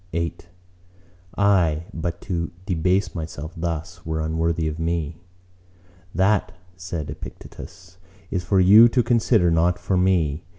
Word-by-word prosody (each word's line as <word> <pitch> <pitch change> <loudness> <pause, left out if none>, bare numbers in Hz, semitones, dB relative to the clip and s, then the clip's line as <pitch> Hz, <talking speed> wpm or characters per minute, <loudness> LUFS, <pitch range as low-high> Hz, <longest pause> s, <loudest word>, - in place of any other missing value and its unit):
VIII 85 0 -1 1.0
"Aye, 90 -6 +2
but 85 +1 -4
to 85 -3 -3 0.2
debase 90 0 0
myself 80 -1 -6
thus 85 +1 -4
were 80 0 -3
unworthy 80 +1 -1
of 80 +1 -4
me." 80 -1 -2 0.9
"That," 95 +3 +2 0.2
said 90 -4 -5
Epictetus, 90 0 -11 0.3
"is 90 -2 -1
for 95 0 +2
you 105 +6 +8
to 125 +1 +2
consider, 115 -6 +3
not 85 +2 +2
for 95 - -1
me. 85 -5 +1
85 Hz, 125 wpm, -23 LUFS, 80-95 Hz, 1.0 s, you